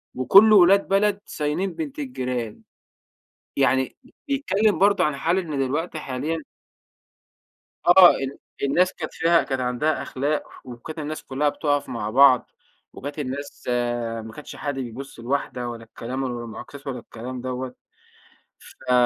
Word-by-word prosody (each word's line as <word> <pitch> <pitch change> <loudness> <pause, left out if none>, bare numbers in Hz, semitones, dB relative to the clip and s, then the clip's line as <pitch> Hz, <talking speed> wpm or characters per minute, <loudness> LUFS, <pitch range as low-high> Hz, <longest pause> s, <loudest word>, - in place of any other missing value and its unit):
وكله 200 - +7
أولاد 195 +1 +6
بلد 200 +1 +2
صاينين 155 +6 -2
بنت 305 -2 -6
الجيران." 125 - -4 1.0
يعني 130 -1 +2 0.3
بيتكلّم 220 -8 +1
برضه 200 -2 +4
عن 150 -2 +1
حال 165 +6 +1
إن 155 -7 -2
دلوقتي 155 +5 -1
حاليًا 145 +5 -3 1.5
آه 180 0 +9
ال 135 +1 -4 0.3
الناس 180 +7 +2
كانت 155 - -6
فيها 170 0 +3
كانت 135 -2 -2
عَندها 125 +5 0
أخلاق 145 +3 -1 0.2
وكانت 130 +6 -8
الناس 155 +1 -5
كلّها 145 +2 0
بتُقَف 145 -1 -1
مع 105 -3 -3
بعض 130 +1 +5 0.4
وكانت 145 +2 -7
الناس 140 +1 -5 0.6
ما 110 - -8
كانش 150 - -9
حد 145 -1 -3
بيبُص 125 +1 -7
لواحدة 125 -1 -2
ولا 115 -1 -7
الكلام 125 +4 -5
ولا 120 -2 -3
المُعاكسات 135 +5 -10
ولا 125 -2 -3
الكلام 120 +2 -8
دَوّة. 130 0 -4 0.9
ف 125 - -7
140 Hz, 135 wpm, -24 LUFS, 125-170 Hz, 1.5 s, آه